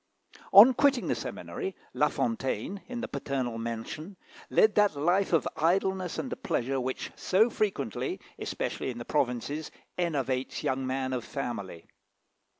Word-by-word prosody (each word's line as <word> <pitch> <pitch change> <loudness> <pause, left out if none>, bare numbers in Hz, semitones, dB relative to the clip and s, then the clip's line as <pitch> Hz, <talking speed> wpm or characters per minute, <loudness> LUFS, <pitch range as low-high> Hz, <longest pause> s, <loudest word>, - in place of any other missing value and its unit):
On 215 +7 +10
quitting 275 0 +3
the - - +3
seminary, 390 -2 -5 0.2
La - - +3
Fontaine, 200 - -2
in 245 -1 -4
the 250 - -3
paternal 125 -4 -3
mansion, 115 - -5 0.3
led 215 -1 +5
that 205 -6 +4
life 175 +7 +2
of 165 - +3
idleness 185 +2 +1
and 255 - -3
pleasure 135 - 0
which 130 +1 -3
so 220 +6 +3
frequently, 140 - -1 0.2
especially - - -3
in 120 - -5
the 120 - -6
provinces, 145 +2 -1 0.3
enervates 135 -7 -1
young 130 0 0
men 130 0 -1
of 125 -2 -2
family. 100 - -5
150 Hz, 140 wpm, -29 LUFS, 130-200 Hz, 0.3 s, On